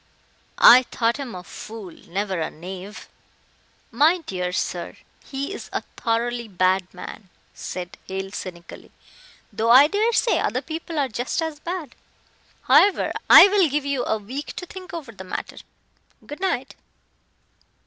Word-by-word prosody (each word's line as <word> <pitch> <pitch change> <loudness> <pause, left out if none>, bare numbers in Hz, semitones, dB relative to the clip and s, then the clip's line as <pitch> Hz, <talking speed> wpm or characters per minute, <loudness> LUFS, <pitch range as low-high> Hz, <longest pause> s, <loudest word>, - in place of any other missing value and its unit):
"I 250 +2 +9
thought 230 0 0
him 265 -7 -6
a 180 - -8
fool, 215 0 -9
never 190 +3 -4
a 160 - -2
knave." 190 +5 -9 0.8
"My 300 +9 +4
dear 180 -1 -3
sir, 175 -1 -3 0.3
he 280 +6 -5
is - - -8
a - - -3
thoroughly 235 +1 -1
bad 185 -1 +1
man," 190 +2 -10 0.2
said 180 -1 -7
Hale 190 0 -5
cynically, 175 -4 -9 0.6
"though 220 +2 0
I 260 +4 +9
daresay 440 +7 +2
other - - -1
people 325 0 -6
are 280 -2 +2
just 245 +1 -3
as 320 -2 -3
bad. 335 -5 -5 0.7
However, 405 - +4 0.2
I - - +11
will 385 -5 +3
give 290 +1 -1
you 280 -2 -1
a 220 - 0
week 255 +8 -7
to 360 - -6
think 375 -1 -10
over 310 -8 -7
the 195 -4 -10
matter. 185 - -6 0.7
Good 295 +2 -8
night." 380 0 -2
235 Hz, 145 wpm, -23 LUFS, 190-300 Hz, 0.8 s, I